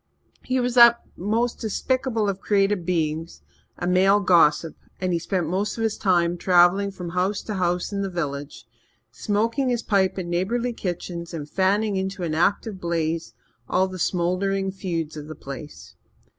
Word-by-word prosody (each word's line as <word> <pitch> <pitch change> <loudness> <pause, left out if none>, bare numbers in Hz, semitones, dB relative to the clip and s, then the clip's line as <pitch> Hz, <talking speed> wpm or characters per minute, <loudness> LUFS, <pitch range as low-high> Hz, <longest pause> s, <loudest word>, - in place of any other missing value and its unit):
He 255 0 0
was 245 0 0
that 235 -1 +8 0.2
most 225 +6 -1
despicable 230 0 -1
of 195 -1 -2
created 195 -3 +1
beings, 160 - -2 0.3
a 175 - -4
male 190 +3 +4
gossip, 165 -4 +3 0.2
and 185 -1 -1
he 170 - +1
spent 175 -1 -2
most 195 +7 -1
of 225 - -2
his 220 -1 0
time 175 -2 +1
travelling 180 +3 +4
from 180 -3 -7
house 185 +4 -1
to 215 - -5
house 180 0 -1
in 200 - -1
the 195 - -2
village, 145 -7 -5 0.5
smoking 230 - 0
his 240 -2 -1
pipe 195 -2 +1
in 185 -2 -4
neighbourly 230 +8 -1
kitchens 175 -3 -5
and 150 -3 -6
fanning 195 +4 +1
into 190 0 -3
an 160 -2 -2
active 190 +4 0
blaze 165 -1 -2 0.3
all 190 +1 +2
the 185 0 -8
smouldering 190 +3 0
feuds 170 -5 -4
of 150 -1 -8
the 155 - -8
place. 140 +2 -9
185 Hz, 165 wpm, -24 LUFS, 170-205 Hz, 0.5 s, that